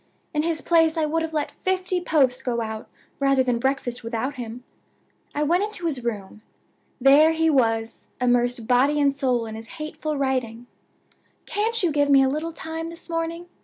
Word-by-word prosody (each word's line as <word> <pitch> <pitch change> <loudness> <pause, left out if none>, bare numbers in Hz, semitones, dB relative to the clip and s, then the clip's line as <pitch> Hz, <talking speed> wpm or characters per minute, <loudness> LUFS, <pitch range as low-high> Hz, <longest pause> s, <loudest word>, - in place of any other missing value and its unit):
In 300 - +1
his 320 -1 -1
place 325 -1 +3
I 315 - +2
would 325 +2 0
have 325 -1 -4
let 295 -1 -1
fifty 370 -1 -1
posts 265 -7 +2
go 245 -2 -1
out 220 -1 -5 0.3
rather 275 -1 +3
than 245 -2 0
breakfast 260 -2 -1
without 230 +4 -2
him. 245 -1 -7 0.7
I 295 - +1
went 345 +6 +2
into 415 -4 -4
his 275 -7 -2
room. 210 -3 -5 0.6
There 285 +5 +6
he 325 0 +2
was, 225 -4 0
immersed 245 -1 +1
body 265 +5 +3
and 280 -1 +3
soul 255 -4 0
in 220 - -7
his 225 +1 -8
hateful 305 -1 -4
writing! 250 -4 -1 0.8
'Can't 445 +1 -1
you 345 - +2
give 290 -1 +2
me 275 -1 +6
a 265 - +3
little 310 +4 -2
time 325 0 -6
this 335 +1 -8
morning? 330 +1 -3
280 Hz, 180 wpm, -24 LUFS, 245-325 Hz, 0.8 s, There